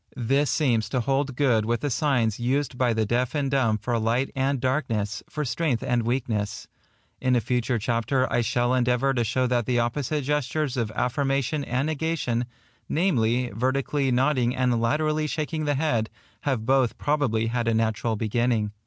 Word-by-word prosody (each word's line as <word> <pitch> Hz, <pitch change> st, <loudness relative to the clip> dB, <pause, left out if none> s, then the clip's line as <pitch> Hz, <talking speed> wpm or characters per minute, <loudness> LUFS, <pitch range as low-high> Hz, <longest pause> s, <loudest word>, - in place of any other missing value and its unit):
This 135 Hz, +4 st, +1 dB
seems 115 Hz, -8 st, +1 dB
to 125 Hz, +1 st, 0 dB
hold 135 Hz, +2 st, 0 dB
good 120 Hz, -5 st, +2 dB
with 115 Hz, +1 st, -1 dB
the 145 Hz, -, -1 dB
signs 120 Hz, -6 st, +1 dB
used 130 Hz, +3 st, 0 dB
by 125 Hz, -1 st, +2 dB
the 110 Hz, -1 st, +1 dB
deal 120 Hz, +4 st, +1 dB
and 140 Hz, -2 st, 0 dB
dumb 115 Hz, -6 st, +2 dB
for 115 Hz, +3 st, -1 dB
light 115 Hz, +4 st, 0 dB
and 135 Hz, 0 st, 0 dB
darkness, 120 Hz, -6 st, -1 dB
for 150 Hz, -1 st, -3 dB
strength 125 Hz, 0 st, -1 dB
and 120 Hz, -1 st, +1 dB
weakness, 115 Hz, -3 st, -2 dB
&c. -, -, -16 dB, 0.6 s
In 125 Hz, -, +4 dB
a -, -, +4 dB
future 120 Hz, +1 st, 0 dB
chapter 115 Hz, +4 st, 0 dB
I -, -, +3 dB
shall 120 Hz, +1 st, +1 dB
endeavour 125 Hz, +2 st, +2 dB
to 120 Hz, -2 st, +1 dB
show 120 Hz, +3 st, 0 dB
that 120 Hz, -2 st, 0 dB
the 125 Hz, -1 st, +1 dB
opposite 135 Hz, +5 st, -1 dB
gestures 150 Hz, 0 st, -1 dB
of 115 Hz, -4 st, -1 dB
affirmation 135 Hz, +2 st, 0 dB
and 125 Hz, +1 st, -1 dB
negation, 155 Hz, -6 st, -1 dB, 0.4 s
namely, 125 Hz, -8 st, +1 dB
vertically 135 Hz, +4 st, 0 dB
nodding 130 Hz, -1 st, +2 dB
and 125 Hz, -2 st, +1 dB
laterally 155 Hz, +5 st, +1 dB
shaking 155 Hz, 0 st, -2 dB
the 145 Hz, -1 st, +1 dB
head, 125 Hz, -7 st, 0 dB, 0.4 s
have 130 Hz, -6 st, 0 dB
both 130 Hz, -1 st, +2 dB
probably 135 Hz, -7 st, 0 dB
had 115 Hz, 0 st, -1 dB
a 115 Hz, -, +3 dB
natural 110 Hz, 0 st, 0 dB
beginning. 110 Hz, 0 st, 0 dB
125 Hz, 175 wpm, -25 LUFS, 115-140 Hz, 0.6 s, In